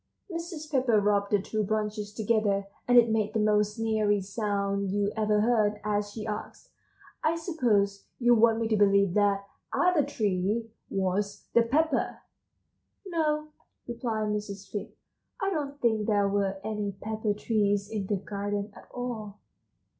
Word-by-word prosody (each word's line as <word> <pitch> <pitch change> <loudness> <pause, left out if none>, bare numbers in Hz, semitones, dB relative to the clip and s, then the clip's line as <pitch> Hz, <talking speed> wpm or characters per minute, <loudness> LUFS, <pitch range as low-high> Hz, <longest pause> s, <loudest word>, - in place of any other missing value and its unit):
Mrs. 335 -2 -6
Pepper 255 -6 +3
rubbed 200 0 +1
two 215 -1 -1
branches 210 0 -2
together, 210 -2 +1 0.2
and 245 0 +5
it 235 -2 +6
made 215 -1 0
the - - +3
most 210 0 +2
sneery 215 -2 +2
sound 200 -1 -1
you 205 +1 0
ever 210 -1 +2
heard, 215 -2 +2
as 205 0 0
she 215 +1 -6
asked: 210 -1 -6 0.5
"I 315 +1 +2
suppose 235 - 0
you 240 -1 +4
want 225 0 +4
me 225 - 0
to 220 - +3
believe 200 -2 +4
that 200 -1 +2 0.3
'other 355 -4 +3
tree' 215 -3 -1 0.2
was 195 +1 -1
the 235 - +6
pepper?" 280 +5 +1 0.9
"No," 305 -4 0 0.4
replied 225 -3 -2
Mrs. 205 -1 -4
Fig, 205 - -4 0.5
"I 390 -2 0
don't 285 -4 -3
think 220 -4 +1
there 205 -2 +3
were 195 -1 0
any 210 -2 -2
pepper 215 +1 -2
trees 205 -2 +1
in 210 -3 -3
the 205 - +1
garden 205 +1 -4
at - - -14
all." 225 -5 -5
210 Hz, 145 wpm, -28 LUFS, 205-235 Hz, 0.9 s, it